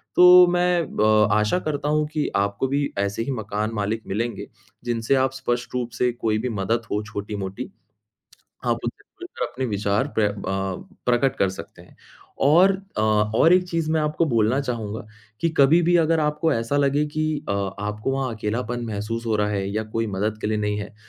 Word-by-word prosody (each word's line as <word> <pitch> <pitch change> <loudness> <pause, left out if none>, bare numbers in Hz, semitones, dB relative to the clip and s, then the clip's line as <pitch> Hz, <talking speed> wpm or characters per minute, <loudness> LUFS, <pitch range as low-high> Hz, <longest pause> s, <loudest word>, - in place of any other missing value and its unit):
तो 180 0 +9
मैं 175 0 +2 0.2
अ 110 -1 +5
आशा 105 +10 +1
करता 150 -2 -2
हूँ 150 0 +2
कि 155 -2 0
आपको 100 +5 0
भी 140 +2 0
ऐसे 100 +2 -1
ही 140 - -3
मकान 105 -1 -3
मालिक 105 +1 -2
मिलेंगे, 115 +4 -3 0.4
जिनसे 120 +2 +1
आप 130 -1 +2
स्पष्ट 120 -2 -3
रूप 125 -1 -2
से 125 +2 +1
कोई 110 -3 -1
भी - - 0
मदद 110 +2 -1
हो 105 - 0
छोटी-मोटी, 100 -3 -5 1.0
आप - - +1
उनसे - - -5 0.2
मिलकर - - -5
अपने 130 +1 -4
विचार 105 +4 0
प्र 110 - +4
अ, 105 - +1 0.7
प्रकट 125 +2 +2
कर 95 - +2
सकते 95 - -10
हैं। - - -20 0.5
और 175 +7 +6 0.3
अ, - - +2
और 110 +8 +3
1 180 0 +2
चीज़ 165 -2 -1
मैं 160 - +2
आपको 150 +2 +1
बोलना 115 0 +2
चाहूँगा 110 -5 -4 0.3
कि 170 - +2
कभी-भी 170 +5 +5
अगर 160 0 +2
आपको 150 +2 +1
ऐसा 115 +3 -1
लगे 145 +1 +2
कि 155 - +1 0.3
अ - - +2 0.3
आपको 105 +5 -2
वहाँ 130 -3 -2
अकेलापन 120 +3 -3
महसूस 110 +2 -4
हो 110 -1 +1
रहा 105 0 +1
है 100 -2 -2
या 110 - 0
कोई 115 0 0
मदद 105 +1 -2
के - - -1
लिए 110 0 0
नहीं 105 0 -1
है, 105 +1 -7
115 Hz, 190 wpm, -23 LUFS, 105-145 Hz, 1.0 s, तो